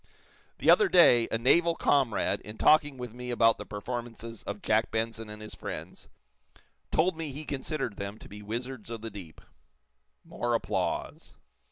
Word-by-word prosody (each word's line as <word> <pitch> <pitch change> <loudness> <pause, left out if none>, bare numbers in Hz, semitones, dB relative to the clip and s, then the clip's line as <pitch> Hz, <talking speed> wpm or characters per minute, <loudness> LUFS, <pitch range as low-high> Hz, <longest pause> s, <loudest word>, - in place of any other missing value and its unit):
"The - - +5
other 410 - +5
day, 120 -10 +6
a - - +1
naval 165 +8 +3
comrade, 135 -8 +1
in 105 +1 -9
talking 145 0 +4
with 125 -3 -7
me 125 0 -7
about 115 -2 +3
the - - -7
performances 115 +1 -6
of 100 0 -5
Jack 110 +1 +2
Benson 115 0 -3
and 105 0 -9
his 105 - -9
friends, - - -7 0.8
told 175 +2 +2
me 160 -3 -5
be 150 +3 -7
considered 135 -5 -3
them 100 +1 -5
to - - -13
be 105 0 -10
wizards 115 +2 -5
of 115 -2 -6
the 115 0 -6
deep." 95 -6 -11 0.8
(More 120 -1 -1
applause.) - - -3
115 Hz, 165 wpm, -29 LUFS, 110-135 Hz, 0.8 s, day